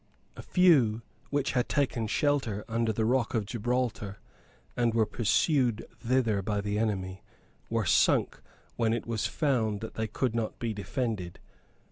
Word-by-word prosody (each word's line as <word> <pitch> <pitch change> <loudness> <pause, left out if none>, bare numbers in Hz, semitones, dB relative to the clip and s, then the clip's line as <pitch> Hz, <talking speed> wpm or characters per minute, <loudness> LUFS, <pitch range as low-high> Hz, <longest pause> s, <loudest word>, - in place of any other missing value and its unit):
A - - -8
few, 135 - +4 0.3
which 145 -1 0
had 125 -2 0
taken 125 -6 0
shelter 120 -5 0
under 115 -1 0
the 110 +1 0
rock 120 0 +1
of 110 -3 0
Gibraltar, 115 -2 -2 0.6
and 120 -2 +1
were 110 -1 +4
pursued 120 +1 +1
thither 115 -4 +1
by 105 +1 -1
the 105 +1 -1
enemy, 95 -4 -2 0.5
were - - 0
sunk - - +3 0.4
when 115 -1 +2
it 115 - -2
was 115 -2 -1
found 120 -9 0
that 110 - -6
they 110 0 -2
could 115 +3 -1
not 115 -2 -2
be 115 -2 -2
defended. 100 -3 -3
115 Hz, 150 wpm, -29 LUFS, 105-125 Hz, 0.6 s, few